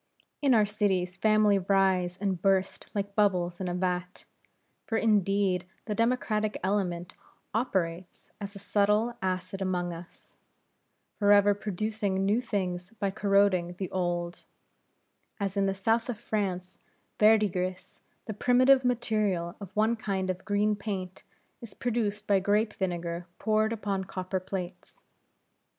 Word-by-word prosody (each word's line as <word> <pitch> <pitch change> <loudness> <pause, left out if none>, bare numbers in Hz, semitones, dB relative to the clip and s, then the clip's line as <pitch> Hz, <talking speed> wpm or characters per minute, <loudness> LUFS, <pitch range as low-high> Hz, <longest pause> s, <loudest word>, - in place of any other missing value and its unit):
In 275 -4 +4
our 215 -2 +5
cities 195 -4 0
families 205 -1 +3
rise 190 -2 +2
and 190 -3 -2
burst 195 -1 +1
like 200 0 -2
bubbles 185 -4 +1
in 185 - -2
a 175 - -2
vat. 180 0 -2 0.6
For 225 - 0
indeed 195 -4 +2 0.2
the 215 - -2
democratic 220 -2 0
element 185 -2 -1 0.4
operates 185 -7 -2
as 200 0 -6
a - - -7
subtile 210 +4 +1
acid 185 +1 -3
among 180 -2 -1
us; 170 +1 -13 0.8
forever 205 0 +5
producing 205 -1 -2
new 210 +5 +2
things 185 -6 -3
by 200 -2 -1
corroding 195 -3 +2
the 185 +1 -5
old; 175 -1 -2 1.0
as 200 -1 -2
in 200 0 +2
the 195 - 0
south 225 +5 +1
of 240 - -2
France 185 -4 -3 0.4
verdigris, 200 -4 +2 0.2
the 215 - -4
primitive 255 +4 +4
material 215 -8 0
of 200 -3 -8
one 220 +2 +3
kind 195 -4 -2
of 185 0 -8
green 210 0 +2
paint, 190 -3 -5 0.4
is 230 -4 -10
produced 215 -4 -1
by 200 -2 +3
grape 210 +3 +1
vinegar 175 -2 -3
poured 215 0 +1
upon 200 -4 -2
copper 185 0 -3
plates. 180 -1 -7
195 Hz, 135 wpm, -28 LUFS, 185-215 Hz, 1.0 s, our